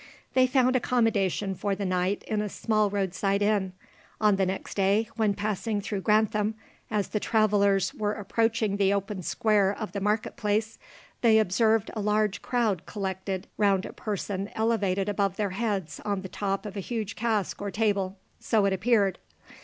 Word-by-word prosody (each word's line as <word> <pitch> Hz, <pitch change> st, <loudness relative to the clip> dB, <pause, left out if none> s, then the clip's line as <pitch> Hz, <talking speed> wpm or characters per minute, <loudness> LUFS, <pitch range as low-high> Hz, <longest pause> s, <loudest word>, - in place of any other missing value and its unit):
They 255 Hz, -1 st, +5 dB
found 255 Hz, 0 st, +3 dB
accommodation 210 Hz, -6 st, +1 dB
for 200 Hz, +1 st, -2 dB
the 200 Hz, -, -3 dB
night 185 Hz, +2 st, 0 dB
in 215 Hz, -1 st, -1 dB
a 210 Hz, -, -3 dB
small 215 Hz, 0 st, +1 dB
roadside 195 Hz, 0 st, 0 dB
inn. 200 Hz, -3 st, +1 dB, 0.5 s
On 210 Hz, -2 st, +4 dB
the 190 Hz, -1 st, +1 dB
next 190 Hz, +1 st, -4 dB
day, 200 Hz, +3 st, +2 dB
when 215 Hz, -3 st, +1 dB
passing 210 Hz, +1 st, -2 dB
through 200 Hz, -1 st, -3 dB
Grantham, 215 Hz, 0 st, +2 dB, 0.3 s
as 210 Hz, -3 st, -1 dB
the 210 Hz, -, -1 dB
travellers 205 Hz, -3 st, +2 dB
were 210 Hz, -1 st, -1 dB
approaching 220 Hz, 0 st, 0 dB
the 200 Hz, 0 st, +3 dB
open 200 Hz, -1 st, -3 dB
square 205 Hz, +1 st, +2 dB
of 210 Hz, -2 st, -5 dB
the 200 Hz, +1 st, -4 dB
market 210 Hz, +2 st, -1 dB
place, 215 Hz, +2 st, -1 dB, 0.4 s
they 225 Hz, -2 st, +5 dB
observed 220 Hz, +1 st, +2 dB
a 215 Hz, -, -3 dB
large 210 Hz, 0 st, +1 dB
crowd 220 Hz, -8 st, 0 dB
collected 190 Hz, -1 st, -4 dB
round 200 Hz, -2 st, +2 dB
a -, -, -8 dB
person 200 Hz, -1 st, -4 dB
elevated 205 Hz, -4 st, +1 dB
above 200 Hz, -2 st, 0 dB
their 205 Hz, -2 st, -1 dB
heads 195 Hz, -4 st, -2 dB
on 200 Hz, -2 st, -2 dB
the 190 Hz, -, -6 dB
top 195 Hz, +1 st, -2 dB
of 210 Hz, -1 st, -6 dB
a -, -, -3 dB
huge 220 Hz, +1 st, -4 dB
cask 220 Hz, -5 st, -1 dB
or 200 Hz, -, -2 dB
table, 200 Hz, -2 st, 0 dB, 0.2 s
so 215 Hz, -3 st, +2 dB
it 195 Hz, -, +2 dB
appeared. 200 Hz, 0 st, +2 dB
205 Hz, 170 wpm, -27 LUFS, 195-220 Hz, 0.5 s, They